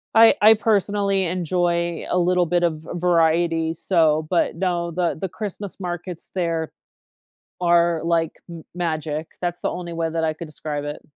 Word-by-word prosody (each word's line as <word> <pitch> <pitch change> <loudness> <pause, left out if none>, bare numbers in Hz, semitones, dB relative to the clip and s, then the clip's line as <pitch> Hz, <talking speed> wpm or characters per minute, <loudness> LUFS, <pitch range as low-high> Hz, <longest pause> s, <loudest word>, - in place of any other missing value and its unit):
I 225 0 +8
I, 215 +1 +9
personally, 200 -3 +1
enjoy 170 -1 -1
a - - +1
little 180 0 +3
bit 175 +1 +1
of 170 -2 +2
v 160 - -16
variety, 165 -1 +2
so 160 -3 +2
but 175 -3 +1
no, 175 -1 -1
the 175 0 0
the 190 - -2
Christmas 200 0 -6
markets 175 -1 -6
there 165 -3 -1 0.9
are 170 -1 +3
like 165 -1 +1 0.2
m 170 -2 -9
magic; 155 -3 -2
that's 175 -1 -3
the - - -1
only 175 -1 -6
way 165 -1 -1
that 165 0 -2
I 155 -1 0
could 165 +2 -8
describe 150 -1 -5
it. 145 0 -6
170 Hz, 165 wpm, -22 LUFS, 165-180 Hz, 0.9 s, I